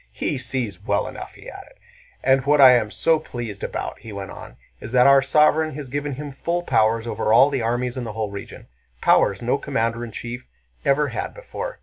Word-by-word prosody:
"He 140 - -3
sees 115 -8 -4
well - - 0
enough," - - -8
he - - -14
added. - - -11 0.5
"And 135 0 +3
what 145 0 +4
I 130 -2 +10
am 120 -4 +3
so 160 +8 +2
pleased 120 -9 -7
about," - - -4
he 115 0 -10
went 100 -2 -7
on, - - -11 0.2
"is 115 - -8
that 125 -1 +5
our 140 0 +7
sovereign 150 +2 +3
has 145 -3 -7
given 145 +1 -3
him 145 +2 -6
full 170 +6 -2
powers 110 -4 +2
over 110 -1 -1
all 135 +6 +6
the 135 -3 -1
armies 120 +2 -1
and 120 -2 -4
the 110 - -6
whole 110 -2 -3
region—powers 60 -10 -1
no - - +1
commander 115 +1 -1
in 115 - -7
chief 120 +4 -7 0.4
ever 145 +1 +2
had - - -5
before. - - -7
125 Hz, 205 wpm, -22 LUFS, 110-145 Hz, 0.5 s, I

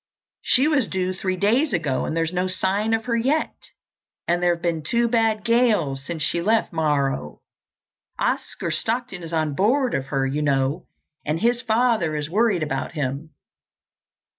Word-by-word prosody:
She 265 +4 +3
was 285 -7 +2
due 185 0 -1
three 185 0 -2
days 230 - +2
ago 155 -7 0
and 160 - -3
there's 165 +1 0
no 180 +1 0
sign 200 +4 0
of 225 - -4
her 235 -2 0
yet. 270 +7 +1 0.7
And 175 +1 +1
there 175 -1 +3
have 170 - -15
been 170 -2 0
two 235 +10 +1
bad 225 -2 +1
gales 215 - +2
since 160 +1 -4
she 170 +3 0
left 220 +1 +1
Morro. 140 - -1 0.8
Oscar - - -2
Stockton 235 -5 -2
is 165 -1 -8
on 155 -3 0
board 245 - +2
of 135 - -2
her, 135 -1 0
you 140 +3 -1
know, 140 +3 0 0.4
and 155 +2 -1
his 240 +4 +1
father 225 -8 +1
is 150 +1 -4
worried 210 -4 +2
about 135 -1 -3
him. 145 0 -3
180 Hz, 165 wpm, -23 LUFS, 150-230 Hz, 0.8 s, She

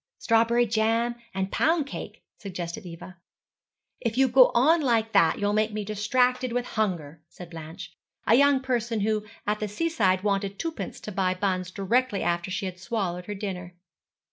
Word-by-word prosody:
'Strawberry 230 +1 +3
jam 225 +2 +1 0.2
and 190 0 -3
pound 320 -2 +2
cake,' 280 - -8 0.2
suggested 180 0 -6
Eva. 175 +1 -10 0.8
'If 230 -1 -2
you 265 0 +5
go 255 0 +6
on 310 +8 +5
like 230 -5 +1
that 165 -6 +4
you'll 205 0 0
make 215 +1 +1
me 210 -1 -3
distracted 250 +5 +1
with 245 +1 -1
hunger,' 165 -8 -2
said 175 -1 -11
Blanche, 165 +3 -9 0.3
a 220 - +4
young 280 +1 +5
person 240 -4 -1
who 215 0 0 0.2
at 210 +1 0
the 215 - -2
seaside 205 - +1
wanted 200 -1 -1
twopence 330 -1 -5
to 210 - -6
buy 185 -2 0
buns 185 -1 -1
directly 205 +4 0
after 175 +1 -1
she 195 +1 -3
had 180 -1 -6
swallowed 185 -4 -3
her 205 - -4
dinner. 185 -3 -6
210 Hz, 170 wpm, -26 LUFS, 185-240 Hz, 0.8 s, go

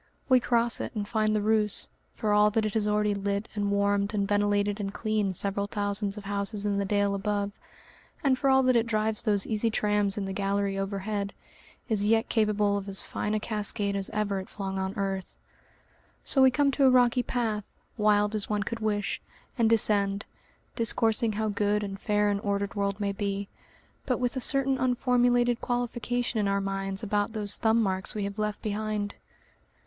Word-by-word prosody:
We 255 -1 +6
cross 235 -1 +1
it - - -6
and 205 -1 -3
find 215 -1 +1
the 210 - 0
Reuss, 215 -1 +1 0.3
for 210 -1 0
all 210 0 +5
that 215 +1 0
it 215 - -2
has 215 -2 0
already 210 0 +1
lit 200 +1 -2
and 205 -1 -1
warmed 200 +1 +1
and 200 -1 0
ventilated 205 0 +1
and 195 -1 -3
cleaned 210 -3 -1
several 200 +2 0
thousands 205 0 -1
of 210 - -7
houses 200 +1 -1
in 200 -1 0
the 200 - -1
dale 205 0 +1
above, 200 0 -2 0.7
and 270 -2 +3
for 270 +1 0
all 265 0 +5
that 255 -1 +3
it 230 0 +2
drives 215 -1 -1
those 205 -3 +1
easy 225 +1 0
trams 210 -2 +1
in 200 - -2
the 195 - -4
gallery 200 0 -1
overhead, 200 +1 -3 0.5
is 215 -4 0
yet 225 +2 +2
capable 210 -2 +1
of 200 0 -6
as 195 - +1
fine 210 +1 -3
a - - 0
cascade 210 -1 -2
as 195 -1 0
ever 205 -2 -1
it 190 - -9
flung 195 -1 -4
on 190 0 -3
earth. 195 -1 -3 0.9
So 270 - +3
we 265 - +7
come 280 +2 +2
to 275 0 +2
a - - +7
rocky 250 -1 +4
path, 225 -4 -3 0.2
wild 210 -1 +2
as 215 -2 -3
one 210 -1 0
could 230 +3 -5
wish, 210 -2 -2 0.3
and 230 -3 +2
descend, 205 -2 +3 0.5
discoursing 225 -1 +2
how 215 +1 -1
good 205 0 0
and 195 -1 -6
fair 210 -2 +1
an 200 - -1
ordered 200 -1 -2
world 200 -1 -2
may 200 -1 -1
be, 200 0 -3 0.6
but 250 -3 +1
with 245 0 -1
a 260 - -2
certain 270 +1 +5
unformulated 245 -1 +2
qualification 245 -1 -2
in 205 - +1
our 200 0 +1
minds 195 +1 -3
about 205 0 -1
those 205 -2 +2
thumb 225 0 +2
marks 190 0 -3
we 210 - -2
have 200 +1 -5
left 210 -1 -3
behind. 210 -1 -2
210 Hz, 195 wpm, -27 LUFS, 200-225 Hz, 0.9 s, we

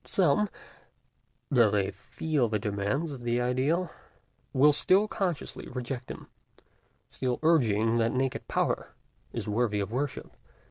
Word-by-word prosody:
Some, 195 +3 +2 1.0
though 120 -5 +5
they 100 -2 0
feel 150 -7 -1
the 105 - +1
demands 105 +9 -1
of 135 -3 -7
the 120 0 0
ideal, 135 +8 0 0.6
will 145 +3 +5
still 190 +8 +4
consciously 185 -7 -3
reject 125 0 -5
them, - - -8 0.9
still 125 -2 -1
urging 115 -8 +3
that 115 0 +2
naked 130 0 -1
Power - - -1 0.4
is - - -5
worthy 105 -1 +1
of 100 +1 -3
worship. 140 +3 -3
125 Hz, 130 wpm, -29 LUFS, 115-150 Hz, 1.0 s, though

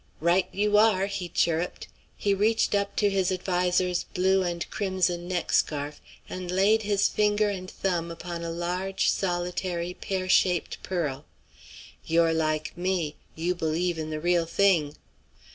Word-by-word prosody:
"Right 175 +3 +2
you 210 +1 +2
are!" 210 -3 +4
he 195 -3 -4
chirruped. 170 +1 0 0.3
He 200 - +1
reached 215 +3 +2
up 200 0 0
to 205 - +3
his 190 -1 +1
adviser's 180 -1 0
blue 190 +1 +3
and 175 -1 -2
crimson 185 -3 -1
neck 180 -2 -2
scarf, 145 0 0 0.3
and 185 -1 -6
laid 200 +5 +3
his 205 -1 +2
finger 210 0 +2
and 185 -2 -6
thumb 175 -3 -2
upon 170 0 -6
a 170 - -3
large, 180 +3 -1
solitary 175 -1 -2
pear 185 0 -3
shaped 180 -2 +2
pearl. 150 -6 -3 0.8
"You're 165 0 +3
like 155 -1 -1
me; 175 -4 -1 0.2
you 170 +3 0
believe 170 0 -1
in 155 0 -4
the 155 0 -3
real 175 0 +1
thing." 165 -6 +2
180 Hz, 145 wpm, -27 LUFS, 170-195 Hz, 0.8 s, are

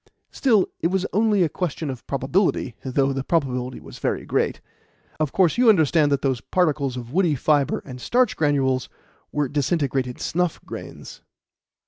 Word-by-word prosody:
Still, 225 -8 +3
it - - +1
was 190 +2 0
only 210 -2 +3
a - - +3
question 155 -2 -3
of 130 - -10
probability, 140 - 0
though 135 +1 +1
the 135 0 -3
probability 130 -5 -1
was - - -12
very - - -2
great. - - 0 0.6
Of 155 -3 0
course, 185 +4 +2
you 250 -2 +6
understand 160 -6 +4
that 140 -1 +1
those 130 -4 0
particles 145 -7 0
of 120 +1 -8
woody 175 -4 +2
fibre 145 0 +1
and 125 -2 -9
starch 250 - +2
granules 135 -4 +1 0.4
were 150 -1 0
disintegrated 140 -3 -1
snuff 180 -1 -1
grains." - - -9
145 Hz, 155 wpm, -23 LUFS, 135-180 Hz, 0.6 s, you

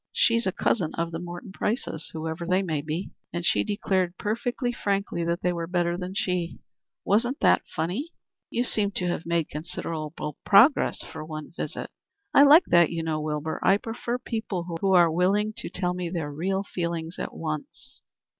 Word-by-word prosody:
She's 230 -2 +3
a - - +2
cousin 180 -3 0
of 170 0 -1
the 165 - -4
Morton 175 +2 -7
Prices, 210 - -2
whoever 160 +1 -4
they 185 +3 +2
may 155 -5 -1
be, 160 +5 -4 0.2
and 175 0 -3
she - - +3
declared 190 -4 0
perfectly 245 +3 -1
frankly 200 -5 -1
that 170 +1 -1
they 180 - +2
were 170 -1 -3
better 175 -1 +1
than 180 +1 -5
she. 180 -4 -1 0.5
Wasn't 240 +7 +2
it - - +5
funny?" 185 - -2 0.4
"You 240 - 0
seem 210 -4 +1
to 180 - -1
have 170 -1 -3
made 170 -2 +1
considerable 155 -1 -4 0.3
progress 225 +8 +5
for - - -8
one 155 -1 -7
visit." - - -5 0.4
"I - - +8
like 290 +5 +8
that, 170 -2 +6
you 165 -1 -3
know, 155 -1 -1
Wilbur. 150 +1 -2
I 195 - +5
prefer 235 +2 -3
people 190 -8 -4
who 195 - +2
are 175 -2 +6
willing 200 +6 +2
to - - -5
tell 180 0 -1
me 180 -1 -3
their 165 -4 -3
real 190 +6 -1
feelings 170 -3 -4
at - - -4
once." 155 -2 -6
180 Hz, 180 wpm, -26 LUFS, 165-200 Hz, 0.5 s, I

